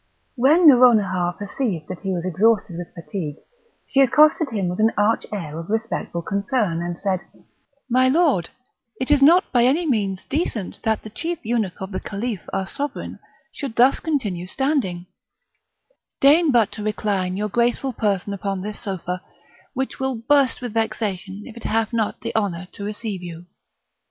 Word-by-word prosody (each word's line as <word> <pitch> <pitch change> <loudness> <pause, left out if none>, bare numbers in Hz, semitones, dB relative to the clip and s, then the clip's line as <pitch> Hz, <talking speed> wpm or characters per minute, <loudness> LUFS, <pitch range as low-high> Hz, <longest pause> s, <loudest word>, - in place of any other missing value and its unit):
When 295 +7 +4
Nouronihar 210 -10 +5
perceived 205 - -3
that 185 - -6
he 195 - -3
was 175 -1 -2
exhausted 200 +1 +2
with 175 0 -7
fatigue, 170 -3 -5 0.5
she 275 - +1
accosted 300 +3 +4
him 205 -6 -1
with 180 +2 -3
an 220 +1 +4
arch 210 +2 +2
air 165 -7 -5
of 165 - -8
respectful 220 -6 -2
concern, 200 -2 -1
and 175 0 -4
said: 190 -1 -1 0.7
"My 255 +1 +3
lord, 275 - +2 0.5
it 260 +3 -1
is 290 -2 +5
not 340 +7 +5
by 240 -2 +4
any 290 +8 +3
means 200 - -1
decent 270 - -3
that 220 -1 0
the 215 - -9
chief 335 +9 -3
eunuch 220 -5 -1
of 190 +1 -6
the 185 - -3
Caliph, 210 -1 -4
our 190 - -1
Sovereign, 285 +9 -5 0.3
should 275 -6 -6
thus 255 +3 +5
continue 210 - -2
standing; 235 - -1 1.1
deign 300 +3 +5
but 230 -4 +3
to 210 - -7
recline 200 -3 -1
your 210 +1 -1
graceful 240 +4 0
person 205 -3 -1
upon 195 -1 -3
this 210 +2 -5
sofa, 185 -4 -4 0.5
which 265 +1 -3
will 265 -1 -1
burst 275 -4 +3
with 240 -3 -4
vexation 205 -3 -2
if 235 - -11
it 235 - -10
have 225 +1 0
not 225 -2 -1
the - - -5
honour 185 -5 -1
to 200 - -9
receive 210 -2 -4
you." 170 -1 -8
215 Hz, 165 wpm, -22 LUFS, 185-255 Hz, 1.1 s, Nouronihar